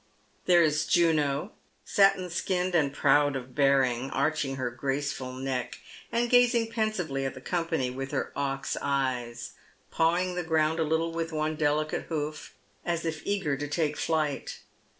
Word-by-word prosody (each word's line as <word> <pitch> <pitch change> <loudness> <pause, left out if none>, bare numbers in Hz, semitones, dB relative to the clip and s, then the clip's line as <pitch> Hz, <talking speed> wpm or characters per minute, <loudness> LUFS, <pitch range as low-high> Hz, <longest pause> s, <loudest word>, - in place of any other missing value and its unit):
There 175 -2 +6
is 150 -1 +1
Juno, 155 0 +2 0.3
satin 195 -3 +3
skinned 180 +1 -1
and 150 -5 +3
proud 145 0 +3
of 130 -1 -6
bearing, 135 -3 +2
arching 140 -1 0
her 130 -2 -2
graceful 135 +1 -3
neck, 130 -1 -3 0.3
and 235 +1 +1
gazing 240 -2 +4
pensively 190 -12 -1
at 135 0 -3
the - - -8
company 165 -4 -1
with 135 +1 -5
her - - -2
ox 135 -1 -2
eyes, 125 -4 -2 0.4
pawing 175 +3 +1
the 180 - -2
ground 160 0 +1
a - - +3
little 160 +2 0
with 165 0 -3
one 155 0 -1
delicate 155 0 0
hoof, 155 -1 -4 0.3
as 170 -1 -2
if 160 -2 -3
eager 190 -8 0
to 145 +2 -4
take 150 0 0
tiight. 155 -4 -2
155 Hz, 150 wpm, -28 LUFS, 135-170 Hz, 0.4 s, There